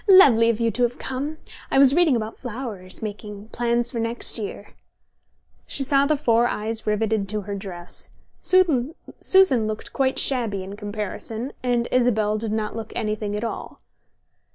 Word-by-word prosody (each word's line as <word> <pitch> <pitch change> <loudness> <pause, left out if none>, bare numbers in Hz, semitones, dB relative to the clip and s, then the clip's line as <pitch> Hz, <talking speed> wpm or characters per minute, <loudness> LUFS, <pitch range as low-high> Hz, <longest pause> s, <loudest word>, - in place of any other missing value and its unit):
"Lovely 255 - +7
of 230 -1 0
you 230 -1 +1
to 230 +4 -4
have 240 0 +1
come! 280 +4 -4 0.3
I - - +1
was 270 -1 +7
reading 330 -4 +4
about 220 -1 -4
flowers, 225 -7 -6
making 210 0 -7
plans 240 0 0
for 235 - -3
next 230 +1 -2
year." 205 -1 -7 0.9
She 275 - 0
saw 275 +1 +3
the 305 0 +2
four 235 -3 +3
eyes 220 0 -3
riveted 210 -1 0
to 210 0 -2
her 200 +1 -6
dress. 185 -3 -7 0.3
Susan 325 - +3
looked 215 0 -5
quite 265 -1 +1
shabby 225 -8 0
in 195 +2 -8
comparison, 215 +4 -5
and 240 -1 0
Isabel 220 -4 +2
did 220 -1 -3
not 215 0 -2
look 225 -1 -6
anything 215 -2 -2
at 210 - -3
all. 230 - -5
230 Hz, 160 wpm, -23 LUFS, 210-255 Hz, 0.9 s, Lovely